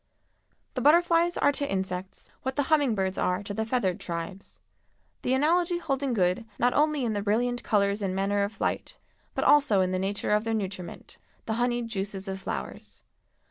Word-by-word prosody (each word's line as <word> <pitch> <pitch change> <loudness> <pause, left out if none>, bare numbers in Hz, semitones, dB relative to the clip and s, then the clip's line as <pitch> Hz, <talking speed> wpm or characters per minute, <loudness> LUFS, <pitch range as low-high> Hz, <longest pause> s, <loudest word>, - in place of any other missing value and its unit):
The - - -2
butterflies 340 +2 +4
are 285 - +4
to 285 0 -2
insects 190 -1 -4
what 265 0 -3
the 285 - +1
humming 285 -7 +3
birds 190 -1 -1
are 180 +2 0
to 205 - -5
the 220 +1 -2
feathered 225 -7 0
tribes, 170 +3 -6 0.6
the 255 - +1
analogy 345 +5 +2
holding 275 -6 -1
good 180 +2 +1
not 245 +1 +2
only 300 -3 +2
in 225 - 0
the 205 - -1
brilliant 240 +4 0
colors 200 -1 +1
and 190 -2 -1
manner 200 +1 +1
of 200 +1 0
flight, 220 - -3 0.4
but - - 0
also 250 -10 +5
in 185 0 +1
the 185 - 0
nature 195 +2 -2
of 210 0 +3
their 225 0 -1
nutriment—the 195 +2 -6
honeyed 240 0 0
juices 195 -2 -4
of 190 0 -4
flowers. - - -6
215 Hz, 180 wpm, -27 LUFS, 195-265 Hz, 0.6 s, also